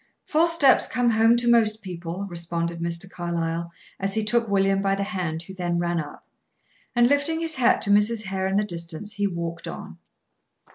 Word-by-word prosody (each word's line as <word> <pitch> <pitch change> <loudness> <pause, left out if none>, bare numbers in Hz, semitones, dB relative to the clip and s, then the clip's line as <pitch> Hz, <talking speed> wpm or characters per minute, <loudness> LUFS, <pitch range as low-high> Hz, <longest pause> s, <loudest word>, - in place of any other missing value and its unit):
"False 335 +2 +2
steps 285 -6 +5
come 245 -1 +1
home 225 +1 +4
to 240 0 +1
most 220 -3 +3
people," 180 0 -5
responded 170 -1 -3
Mr. 170 +2 -3
Carlyle, 170 -1 -3 0.3
as 195 0 -1
he 220 -1 0
took 235 +1 +2
William 195 -1 +2
by 195 0 +1
the 200 - -2
hand, 175 -4 -3
who 190 - -10
then 175 -2 -2
ran 175 0 0
up. 150 -2 -8 0.7
And, 240 0 +5
lifting 285 +4 +1
his 330 -1 -1
hat 260 -4 +2
to 205 - +1
Mrs. 210 +2 +3
Hare 190 -1 -2
in 190 +1 0
the 210 - +2
distance, 170 +1 -5
he 205 -1 0
walked 170 -2 -5
on. - - -8
195 Hz, 190 wpm, -24 LUFS, 170-225 Hz, 0.7 s, steps